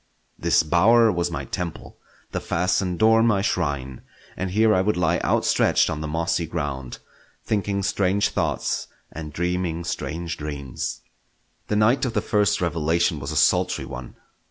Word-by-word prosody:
This - - +2
bower 110 +8 +5
was 85 -1 -1
my 85 - -4
temple, 85 -1 -6 0.3
the - - -2
fastened 90 +1 0
door 115 +2 +5
my 105 -4 +2
shrine, 70 - -2 0.3
and 90 - -3
here 110 +3 +3
I 95 - +3
would 105 +1 0
lie 85 -1 +2
outstretched - - +2
on 75 - -4
the 75 - -3
mossy 80 +2 -1
ground, 70 -6 -4 0.5
thinking 100 -2 -1
strange 100 +1 +1
thoughts - - -1 0.2
and 80 -1 -7
dreaming 90 0 -2
strange 85 0 -4
dreams. 70 -4 -5 0.7
The 105 - -1
night 110 +5 +3
of 125 -4 -1
the 105 - +1
first 105 -1 +1
revelation 85 -1 +1
was 70 - -5
a - - -4
sultry - - +2
one. 60 0 -8
90 Hz, 155 wpm, -23 LUFS, 80-100 Hz, 0.7 s, bower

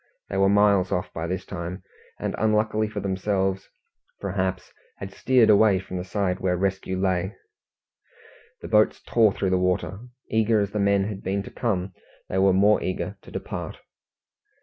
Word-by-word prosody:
They 95 - -3
were 95 0 +4
miles 100 -2 +4
off 90 - -2
by 80 +1 -4
this 95 +1 -3
time, 90 0 -6 0.4
and - - -2
unluckily 110 0 +1
for 105 -1 -5
themselves, 95 0 -1 0.5
perhaps, 95 -1 -3 0.2
had 95 0 -8
steered 125 -4 +4
away 105 -1 +5
from 95 -1 -6
the 90 - -3
side 95 -1 -1
where 90 -1 0
rescue 95 0 -1
lay. 95 0 0 1.3
The - - -5
boats 105 -1 +3
tore 110 -3 +4
through 95 -1 -1
the 95 - +2
water. 90 +1 -1 0.3
Eager 110 0 +2
as 100 -1 -1
the 105 - -2
men 100 -1 +3
had 100 -1 -5
been 100 +1 -2
to - - -10
come, 95 -5 -2 0.4
they 95 - 0
were 95 0 +5
more 100 +3 +4
eager 95 - -3
to - - -14
depart. - - -6
95 Hz, 170 wpm, -25 LUFS, 95-105 Hz, 1.3 s, away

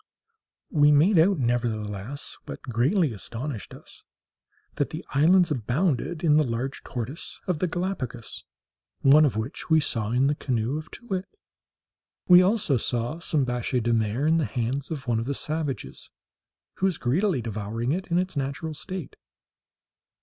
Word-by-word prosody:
We 150 -2 +5
made 160 +6 +5
out, 185 +3 +4
nevertheless, 120 -1 -2
what - - -7
greatly 135 - +1
astonished 115 +3 -6
us, - - -12 0.7
that - - 0
the - - -7
islands 170 +5 +4
abounded 150 - -1
in 150 -2 +5
the 155 - +5
large 125 +2 -3
tortoise 130 +5 -5
of 180 -5 -1
the 185 - +1
Gallipagos, 160 - -4 0.6
one 150 +3 +7
of 125 -7 0
which 110 +5 -5
we 160 0 +6
saw 115 -8 -1
in 125 +3 +2
the 145 - +3
canoe 130 0 -1
of 155 +1 -10
Too 240 - -12
wit. 190 -4 -3 1.0
We 180 -1 +9
saw 185 - +4
also 200 - +2 0.4
some 155 -4 +2
biche 125 +1 -1
de 120 +1 +2
mer 115 +4 0
in 160 +1 +4
the 160 - +1
hands 125 +5 -2
of 140 -5 -5
one 115 -2 +1
of 115 - -3
the 140 +2 -2
savages, 155 -2 -4 0.7
who 190 - +2
was 180 -4 -1
greedily 145 - +1
devouring 110 +3 -3
it 185 +4 -2
in 170 - +1
its 185 -2 -1
natural 140 +3 -3
state. 175 +2 -6
140 Hz, 160 wpm, -26 LUFS, 120-165 Hz, 1.0 s, We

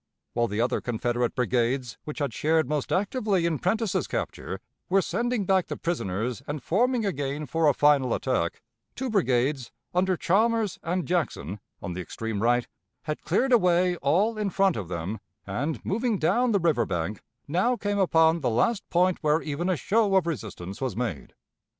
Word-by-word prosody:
While 120 0 +1
the 105 +1 -1
other 120 - 0
Confederate 120 0 -1
brigades, 125 0 0
which 150 - -6
had 140 -6 -2
shared 160 +1 +2
most 150 -1 -2
actively 200 -2 +1
in 160 -4 0
Prentiss's 220 +2 0
capture, - - -4 0.3
were 195 - +4
sending 235 +1 -1
back 190 -1 +2
the - - -4
prisoners 120 - -2
and 145 -3 -4
forming 235 - +1
again 145 -4 -2
for 160 +3 +1
a - - +3
final 140 -4 +4
attack, 100 -11 -1 0.3
two 260 -1 -3
brigades, 130 - +1 0.2
under 185 0 +2
Chalmers 220 +3 +1
and 175 +1 -1
Jackson, 120 - -2 0.2
on 90 - -4
the 90 - -4
extreme 110 +3 -4
right, 120 +1 +2 0.4
had 150 0 -4
cleared 250 +10 +1
away 180 -4 +4
all 200 +10 +1
in 210 -2 0
front 195 -1 +2
of 100 -5 -4
them, 90 +5 -4 0.3
and, 135 +11 -3
moving 225 +2 0
down 240 +9 +2
the 200 - +3
river 155 - +2
bank, 95 +3 -3 0.3
now 185 - +2
came 205 -3 -1
upon 160 -3 +4
the 130 - +1
last 190 - +1
point 180 +1 +2
where 155 +1 +2
even 160 +4 -2
a 185 - +1
show 210 +1 +2
of 190 -3 +4
resistance 100 - -5
was 130 -7 -2
made. 110 - -4
160 Hz, 175 wpm, -26 LUFS, 120-195 Hz, 0.4 s, were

